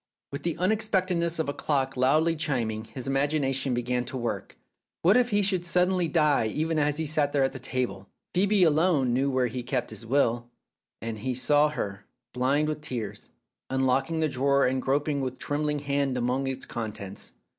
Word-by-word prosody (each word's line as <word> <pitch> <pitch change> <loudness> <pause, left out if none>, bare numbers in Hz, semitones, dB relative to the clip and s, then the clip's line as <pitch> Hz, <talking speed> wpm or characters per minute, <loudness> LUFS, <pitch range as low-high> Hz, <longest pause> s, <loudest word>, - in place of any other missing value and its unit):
With 140 - -5
the 170 -2 -2
unexpectedness 185 -4 +1
of 160 - -1
a 140 - -1
clock 140 -2 -1
loudly 155 +6 +3
chim 135 -8 0
ing, 110 +1 -6
his 130 +3 -6
imagination 135 -2 +1
began 125 0 -1
to 130 - -5
work 120 -2 -4
again. - - -34 0.4
What 185 +5 +5
if 250 -1 +3
he 205 -2 +2
should 190 -3 +1
suddenly 180 0 +2
die 150 -7 +3
even 155 +7 -1
as 145 0 +1
he 160 - -1
sat 145 -1 +2
there 140 -2 +3
at 135 - 0
his - - -7
table! 125 -7 -3 0.2
Phcebe 195 +1 +3
alone 155 -5 +3
knew 135 +3 +1
where 130 -1 +1
his 125 +1 -3 0.4
will 125 +1 +3
was 120 - -6
kept, 120 - -26 0.6
and 115 -1 -4
he 125 +3 -2
saw 145 +4 +3
her, 100 -9 -5 0.3
blind 135 +4 +1
with 155 0 -3
tears, 120 -8 -5 0.4
unlocking 135 +4 +1
the 155 - +3
drawer 140 0 +2
and 130 +1 0
groping 140 +2 0
with 130 -1 -3
trembling 150 0 -1
hand 140 -2 -1
among 125 +2 0
its 130 0 -3
contents. 105 -4 -6
140 Hz, 190 wpm, -27 LUFS, 125-160 Hz, 0.6 s, What